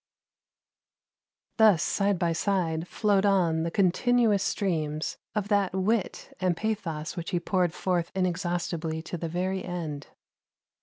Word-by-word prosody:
Thus 215 -7 +6
side 200 -1 +1
by 170 -1 +1
side 170 -2 0
flowed 205 -1 +2
on 180 -5 +3
the 165 - -1
continuous 210 +3 +3
streams 155 -7 -1 0.2
of 205 -2 -1
that 200 -3 +2
wit 195 +2 -1
and 180 -2 +1
pathos 170 -8 -3
which 170 -2 -5
he 175 - 0
poured 180 -1 +1
forth 175 -1 -1
inexhaustibly 175 -3 -1
to 170 - -5
the 165 - -3
very 185 +3 -2
end. 160 -5 -5
180 Hz, 130 wpm, -27 LUFS, 165-200 Hz, 0.2 s, Thus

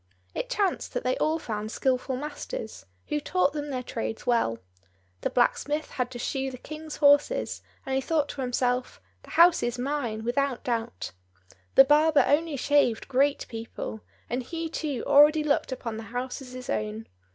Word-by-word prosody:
It - - -3
chanced 400 -3 0
that - - -1
they - - +1
all 315 -8 +1
found 215 -7 -4
skilful 260 +1 0
masters, 255 - -6 0.2
who 300 - 0
taught 320 -1 +1
them 295 -1 -4
their 255 -2 -3
trades 110 - -4
well. 230 - +2 0.6
The - - 0
blacksmith 290 +5 +1
had 250 -1 -2
to 250 - -7
shoe 270 +2 -2
the 255 - -8
King's 310 +3 -8
horses, 290 +13 +3 0.2
and 265 - -3
he 265 - +2
thought 300 0 +1
to 285 - -5
himself, 250 0 -1 0.2
"The - - -16
house 340 +1 +6
is 240 +1 -1
mine, 245 -4 -2
without 255 +2 0
doubt." 235 -1 -3 0.6
The 270 - +9
barber 300 +2 +5
only 300 +2 +2
shaved 275 -4 +2
great 275 +2 +2
people, 225 -1 -6 0.3
and 245 +2 -2
he 330 +5 -4
too 295 -5 -3
already 300 +2 +6
looked 285 -2 +1
upon 230 -3 -4
the 225 - -6
house 250 +3 -4
as 255 -1 -10
his 255 0 -8
own. 105 0 -2
265 Hz, 175 wpm, -27 LUFS, 240-295 Hz, 0.6 s, The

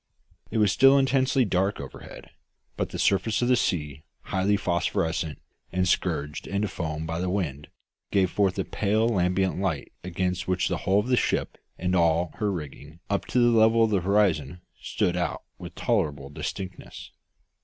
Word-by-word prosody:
It - - -3
was 105 -3 +4
still 135 +5 +6
intensely 135 -1 +2
dark 95 +1 0
overhead; 70 -1 -10 0.4
but - - -2
the - - -6
surface 100 +4 +1
of 120 - +1
the 125 - +5
sea, 75 - -1 0.2
highly 95 +2 0
phosphorescent, 80 -3 -1 0.3
and 90 +1 0
scourged 75 -3 -1
into 100 +2 -1
foam 80 -3 -4
by 80 +1 -3
the 90 - -1
wind, 75 -7 -3 0.4
gave 95 -2 +2
forth 100 -2 +1
a 95 - -1
pale 110 +2 +1
lambent 95 -3 +1
light 95 -7 -2
against 90 0 -2
which 90 -1 0
the - - -1
hull 95 - +4
of 105 +3 +1
the 125 - +3
ship - - 0 0.2
and 90 +1 -1
all 85 -1 +2
her 105 -2 +1
rigging 75 -2 -8
up 100 - -1
to - - -2
the 120 -1 +4
level 115 +1 +5
of 110 - +2
the 100 -3 +2
horizon 90 -5 +1 0.2
stood 90 - -1
out 90 -2 -2 0.2
with - - -9
tolerable 70 -2 -1
distinctness. 90 +5 -7
95 Hz, 170 wpm, -26 LUFS, 80-105 Hz, 0.4 s, still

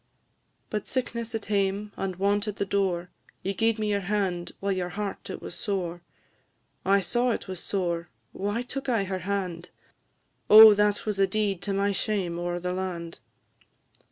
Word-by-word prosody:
"But 210 -1 -3
sickness 235 -3 -2
at 220 - -4
hame, 200 0 0
and 190 -1 -3
want 200 +3 +1
at 210 - -3
the 200 - -1
door 185 -3 0 0.3
You 195 - -1
gi'ed 225 +3 +1
me 215 -1 -1
your 200 - +2
hand, 190 -4 -1
while 200 0 -1
your 185 -2 -1
heart 200 +1 -5
it - - -6
was - - -6
sore; 180 -5 -3 0.8
I 195 +1 +4
saw 240 +7 +1
it 225 - -2
was 185 -2 -5
sore, 175 -4 -2 0.2
why 205 +5 -2
took 270 +2 -5
I 230 -5 +2
her 190 -1 -3
hand? 180 -2 -3 0.8
Oh, 220 0 +11
that 205 0 +1
was 210 -2 -2
a 195 - +5
deed 200 -2 0
to 200 - -2
my 200 +1 +1
shame 190 -4 -1
o'er 175 0 -2
the 180 +1 -2
land! 175 -3 -4
200 Hz, 175 wpm, -27 LUFS, 180-210 Hz, 0.8 s, Oh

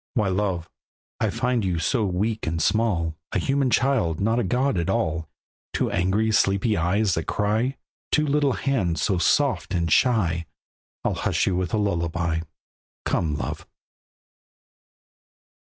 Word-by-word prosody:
Why 105 -5 +2
love! 95 -3 -1 0.5
I - - +1
find 125 -2 0
you 90 -3 0
so 110 +6 +1
weak 105 +3 -1
and 80 +1 -1
small, 85 -5 +1
A - - +1
human 135 -1 +1
child, 120 - +1
not 115 +4 +1
a - - +1
god 125 +1 +1
at 85 - -2
all; 80 -8 -1 0.4
Two - - 0
angry, 95 +5 +1
sleepy 105 +1 +2
eyes 95 +4 +1
that 80 - -2
cry, 110 +6 0 0.3
Two 150 - +3
little 145 -2 +2
hands 95 - 0
so 95 -3 +1
soft 135 -2 +1
and 85 -2 0
shy, 85 - +2 0.6
I'll - - +1
hush - - 0
you 95 - +1
with 90 -2 -1
a - - +1
lullaby. 85 -4 0 0.7
Come, 80 -4 0
love! - - -5
100 Hz, 145 wpm, -24 LUFS, 85-115 Hz, 0.7 s, Two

